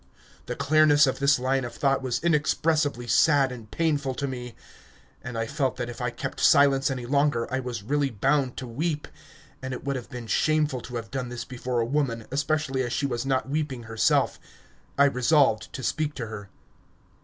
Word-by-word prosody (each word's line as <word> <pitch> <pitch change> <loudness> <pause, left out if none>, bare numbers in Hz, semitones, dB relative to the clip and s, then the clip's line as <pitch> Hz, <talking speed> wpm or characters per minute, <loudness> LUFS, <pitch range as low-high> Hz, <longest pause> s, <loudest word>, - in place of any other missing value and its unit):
The - - -3
clearness 155 0 +5
of 130 - -1
this 140 +1 +4
line 130 +1 0
of 120 -1 -6
thought 135 -1 +1
was 125 -2 -1
inexpressibly 150 -4 +1
sad 135 +3 +4
and 115 -4 -9
painful 145 -4 0
to 140 - -2
me, 125 -3 -6 0.7
and 125 -2 -6
I 115 - -1
felt 135 +2 -1
that 120 0 -3
if 120 - -9
I 125 - 0
kept 120 - -6
silence 140 -1 +5
any 130 -2 -4
longer 140 -2 +1
I 130 - +1
was 120 -5 -5
really 140 +4 0
bound 130 +3 0
to 130 - -5
weep... 150 +5 -2 0.5
And 130 -1 -4
it - - -9
would 140 0 -2
have 125 - -8
been 125 -3 -7
shameful 150 +3 +1
to 125 +1 -8
have 115 -1 -5
done 130 -3 -3
this 120 -1 -6
before 125 -1 -2
a - - 0
woman, 120 -4 -1
especially 140 -1 0
as 120 -2 -2
she 140 - -1
was 125 -1 -2
not 130 -1 0
weeping 140 -4 -3
herself. 115 0 +1 0.6
I 140 - +6
resolved 135 -3 +2
to 130 - -6
speak 150 +1 -1
to 120 - -4
her. 105 -3 -8
130 Hz, 195 wpm, -26 LUFS, 120-145 Hz, 0.7 s, I